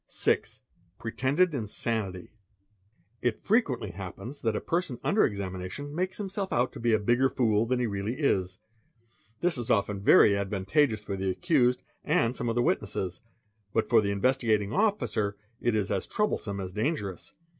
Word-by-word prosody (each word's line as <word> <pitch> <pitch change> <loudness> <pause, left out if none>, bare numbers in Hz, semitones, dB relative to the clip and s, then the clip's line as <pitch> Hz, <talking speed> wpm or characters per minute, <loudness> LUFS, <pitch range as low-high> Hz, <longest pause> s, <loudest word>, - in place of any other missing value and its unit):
| - - -58
6. - - 0 0.4
Pretended 140 +9 +1
Insanity. 105 -5 -3 0.9
It 120 -3 0
frequently 145 - +1
happens 100 +9 -8
that 110 -2 0
a - - 0
person 165 -8 -2
under 210 - +3
examination 100 +7 -3
makes 185 +3 -2
himse! 195 -1 -4
out 125 +2 +1
to - - -8
be 115 0 +1
a - - +5
bigger 120 +5 +3
fool 115 -4 +2
than 125 +1 +1
he 125 - +1
really 100 +2 -2
is; 95 - +1 0.8
this 170 -6 +2
is 120 - -5
often 100 -1 +1
very 100 - +7
advantageou 100 +4 +1
for 100 - -3
the 95 0 -1
accused 125 - +2 0.2
and 115 +2 +2
some 120 - -2
of 115 - -1
the 120 - +2
witnesses, 95 -2 -1 0.5
but 110 - +1
for 115 -2 +5
the 100 - -1
Investigatin 110 -1 +1
Officer 195 - +1 0.2
it 120 -2 +1
is 105 -2 0
as 100 -2 -1
troublesome 110 - -1
as 95 -1 -5
dangerous. 105 - -3
115 Hz, 165 wpm, -28 LUFS, 100-135 Hz, 0.9 s, very